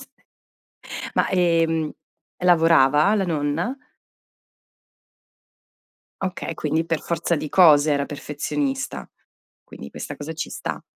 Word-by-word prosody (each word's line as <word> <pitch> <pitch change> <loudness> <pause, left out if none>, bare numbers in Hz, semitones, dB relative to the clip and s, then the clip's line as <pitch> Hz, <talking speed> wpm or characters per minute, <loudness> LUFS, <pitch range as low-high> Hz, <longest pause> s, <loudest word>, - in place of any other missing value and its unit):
S - - -12 1.1
ma - - +2
ehm, 165 -3 +1 0.5
lavorava 165 -1 +5
la 195 - +1
nonna? 165 - -2 2.4
Okay, 185 -2 -4
quindi 155 +2 -1
per 165 -2 -2
forza 170 0 -1
di 150 0 -4
cose 155 -4 +6
era 140 0 0
perfezionista. 145 -2 -4 0.6
Quindi 70 - -11
questa - - -7
cosa 150 +2 -6
ci 165 - -5
sta. - - -5
160 Hz, 105 wpm, -22 LUFS, 145-170 Hz, 2.4 s, cose